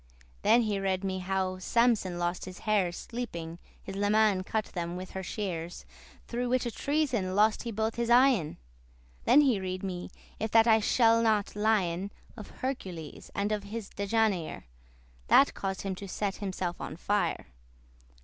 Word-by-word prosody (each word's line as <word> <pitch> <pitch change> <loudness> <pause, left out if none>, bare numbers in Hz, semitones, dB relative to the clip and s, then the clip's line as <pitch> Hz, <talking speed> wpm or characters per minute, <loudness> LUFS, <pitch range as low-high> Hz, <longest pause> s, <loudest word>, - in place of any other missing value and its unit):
Then 235 - +4
read 190 -1 0
he - - -1
me 190 0 -2
how 185 0 -1
Samson 220 -4 +2
lost 175 +1 -2
his 185 -1 -9
hairs 195 -5 +1
Sleeping, 170 -9 -6 0.2
his 195 - -7
leman 205 -1 +3
cut 215 +2 -1
them 175 -1 -4
with 185 +1 -7
her 190 - -4
shears, 180 -3 -5 0.4
Through 245 +1 -2
whiche 245 -2 0
treason 260 -11 0
lost 215 +1 +3
he 235 - -4
both 220 +1 -2
his 235 0 -1
eyen. 240 - +4 0.7
Then 290 - +7
read 190 -9 0
he - - -1
me, 180 -1 -5 0.3
if 220 - -1
that 225 0 +7
I 225 -1 +5
shall 230 +1 +4
not 215 -3 +1
lien, 200 -4 +1 0.3
Of 215 -4 -9
Hercules, 185 - -6
and 200 +1 0
of 210 -1 -2
his 215 0 -6
Dejanire, 200 -4 0 0.6
That 280 - +6
caused 195 -1 -3
him 195 -1 -2
to 200 - -7
set 195 +1 -2
himself 185 -3 -4
on - - -5
fire. 205 +3 -1
200 Hz, 160 wpm, -29 LUFS, 185-225 Hz, 0.7 s, Then